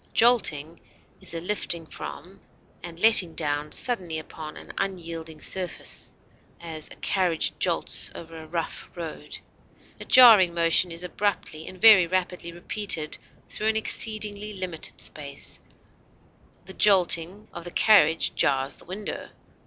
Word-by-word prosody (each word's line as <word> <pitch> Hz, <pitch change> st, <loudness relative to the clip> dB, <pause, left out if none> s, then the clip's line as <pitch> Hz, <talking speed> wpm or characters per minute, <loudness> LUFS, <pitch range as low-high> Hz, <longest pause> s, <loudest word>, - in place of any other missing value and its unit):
Jolting 170 Hz, -10 st, +2 dB, 0.4 s
is -, -, -4 dB
a -, -, -2 dB
lifting 175 Hz, -3 st, -3 dB
from 180 Hz, +5 st, -10 dB, 0.4 s
and 170 Hz, -1 st, -9 dB
letting 190 Hz, -6 st, +6 dB
down 150 Hz, -1 st, -2 dB
suddenly 185 Hz, -10 st, -1 dB
upon 155 Hz, 0 st, -9 dB
an -, -, -11 dB
unyielding 165 Hz, -4 st, -5 dB
surface; 185 Hz, -2 st, -3 dB, 0.5 s
as, 160 Hz, -2 st, -7 dB
a -, -, -12 dB
carriage 180 Hz, -4 st, 0 dB
jolts -, -, -1 dB
over 165 Hz, 0 st, -10 dB
a 160 Hz, -, -11 dB
rough 165 Hz, 0 st, -5 dB
road. 165 Hz, -2 st, -7 dB, 0.6 s
A -, -, -8 dB
jarring 215 Hz, -9 st, +7 dB
motion 170 Hz, +1 st, +3 dB
is 165 Hz, +1 st, -4 dB
abruptly 180 Hz, -4 st, -3 dB
and 185 Hz, -, -10 dB
very 210 Hz, -5 st, +7 dB
rapidly 180 Hz, -1 st, -2 dB
repeated 175 Hz, -2 st, -2 dB, 0.3 s
through 215 Hz, -, -4 dB
an 220 Hz, -, +2 dB
exceedingly 215 Hz, -1 st, +1 dB
limited 185 Hz, -4 st, -5 dB
space; 140 Hz, -2 st, -5 dB, 1.1 s
the 190 Hz, -, -9 dB
jolting 185 Hz, 0 st, +3 dB
of 170 Hz, -, -8 dB
the 175 Hz, -, -7 dB
carriage 165 Hz, -5 st, +4 dB
jars 135 Hz, -1 st, 0 dB
the -, -, -14 dB
windows. 200 Hz, +3 st, -7 dB
175 Hz, 130 wpm, -25 LUFS, 160-200 Hz, 1.1 s, jarring